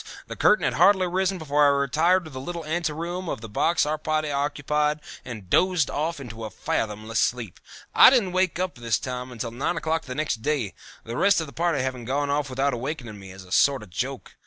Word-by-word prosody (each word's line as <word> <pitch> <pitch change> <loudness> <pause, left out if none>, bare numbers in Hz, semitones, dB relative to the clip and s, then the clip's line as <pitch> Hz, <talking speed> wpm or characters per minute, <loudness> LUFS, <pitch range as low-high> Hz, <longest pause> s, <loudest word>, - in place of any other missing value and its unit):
The - - -7
curtain - - +4
had - - +1
hardly 190 -2 +5
risen 190 +1 0
before 150 -3 +1
I - - +7
retired 165 +7 +2
to 155 - -10
the 130 -1 -7
little 170 +2 -5
ante 165 +1 -1
room 170 +3 -4
of - - -4
the 115 - -7
box 160 +11 +1
our 155 +1 -2
party 155 -1 -1
occupied 150 +1 0 0.2
and 110 -6 -8
dozed 180 - +2
off 160 +2 -2
into 115 -4 -8
a 110 - -4
fathomless 110 +2 -2
sleep. 120 -7 -1 0.3
I - - +9
didn't 235 -8 +2
wake 185 -1 +1
up 185 0 -2
this 115 -3 -1
time 125 0 -5
until 115 -1 -5
nine 135 +8 -2
o'clock 160 0 -1
the 130 - -6
next 145 -6 -2
day, 135 -7 -1 0.3
the 115 +2 -6
rest 200 -1 +4
of 160 - -2
the 140 - -12
party 165 -5 0
having 130 -2 -4
gone 140 +3 -1
off 145 0 0
without 135 +1 0
awakening 120 -4 -5
me, 95 -1 -11
as 95 +1 -11
a 90 - -17
sort 135 +1 +3
of 100 - -15
joke. 130 +8 -4
145 Hz, 225 wpm, -25 LUFS, 120-165 Hz, 0.3 s, I